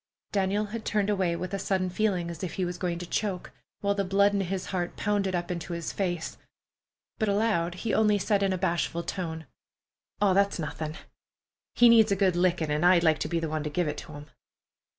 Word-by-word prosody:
Daniel 200 +1 +1
had 220 +2 -6
turned 210 -1 0
away 185 -4 +1
with 185 +2 -5
a 195 - -1
sudden 190 -1 0
feeling 185 -2 0
as 170 - -8
if 175 -3 -3
he 185 - 0
was 175 0 -5
going 175 -2 -1
to 175 - -6
choke, 190 0 -2 0.3
while 200 0 +2
the 200 0 0
blood 200 +2 +3
in 200 - +1
his 190 0 -3
heart 175 -2 -2
pounded 200 -3 0
up 175 0 -2
into 175 0 -4
his 170 -1 -4
face. 175 -4 -3 0.8
But 220 -2 +1
aloud 200 -5 +1
he 215 +4 -3
only 210 -1 +4
said 205 +1 +1
in 195 -1 +2
a 185 - 0
bashful 170 0 -1
tone: 160 -4 -4 0.7
"Aw, 205 -2 +4
that's 200 +1 +2
nothin'. 155 -1 -4 0.8
He 240 - +7
needs 225 -2 +6
a - - +4
good 190 -2 +2
lickin', 175 -3 +1
an' 150 +2 0
I'd 175 -1 +5
like 160 -2 +3
to - - -2
be 170 0 0
the 165 - -2
one 155 -1 -2
to 150 - -3
give 170 +3 0
it 150 - -3
to 155 - -10
him." 145 0 -9
185 Hz, 220 wpm, -28 LUFS, 170-200 Hz, 0.8 s, He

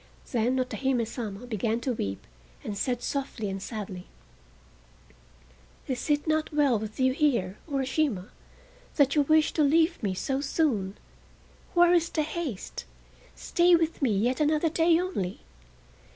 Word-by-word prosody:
Then 245 +2 +1
Otohime 255 -1 0
Sama 220 -1 -6
began 225 0 -1
to 255 +1 -1
weep, 100 - -4 0.4
and 205 - -4
said 245 +4 -2
softly 255 -7 -3
and 195 0 -5
sadly: 195 -5 -6 1.8
"Is 260 +2 -4
it 295 0 +2
not 310 -1 0
well 285 -7 +3
with 215 +2 -7
you 260 0 +3
here, 235 -10 +1
Urashima, 265 -7 -1 0.7
that 280 -2 +4
you 295 - +4
wish 310 +2 +3
to 315 - 0
leave 325 +4 +3
me 195 -4 -1
so 270 +8 -1
soon? 255 - 0 0.8
Where 350 0 +6
is 335 -1 +3
the 310 - 0
haste? 305 - -5 0.5
Stay 350 0 +3
with 330 -1 0
me 230 -8 +2
yet 245 +5 +1
another 305 +2 +2
day 330 +1 +3
only!" 275 - -3
265 Hz, 140 wpm, -27 LUFS, 220-310 Hz, 1.8 s, Where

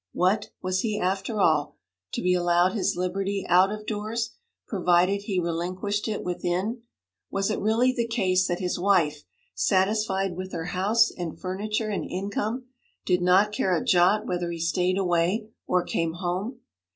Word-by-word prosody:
What! 200 +4 +1
was 185 0 0
he, 210 0 -1
after 195 +4 -1
all, 155 -6 +2 0.4
to - - -2
be 180 0 +3
allowed 175 +1 +3
his 210 - 0
liberty 195 +2 -2
out 185 +3 +5
of 210 0 -6
doors, 220 +2 -3 0.4
provided 180 0 +2
he 200 -3 -1
relinquished 180 +5 -2
it 215 -2 -3
within? 180 +6 -2 0.5
Was 195 +2 0
it - - -1
really 230 +5 +2
the 235 -2 -1
case 190 -5 +1
that 175 - -1
his 180 -2 -2
wife, 170 -6 +2 0.3
satisfied 195 - +1
with 185 +1 -6
her 165 -1 -3
house 205 +6 +2
and 175 -3 -5
furniture 210 +4 -2
and 205 - -3
income, 205 +6 -3 0.4
did 180 -1 +2
not 185 +4 +4
care 190 -3 +1
a - - -3
jot 190 +5 +4
whether 175 -1 -2
he 170 - -4
stayed 180 +3 +1
away 185 +4 +1 0.2
or 180 -1 +2
came 165 -2 -1
home? 185 +8 -3
190 Hz, 165 wpm, -26 LUFS, 180-210 Hz, 0.5 s, out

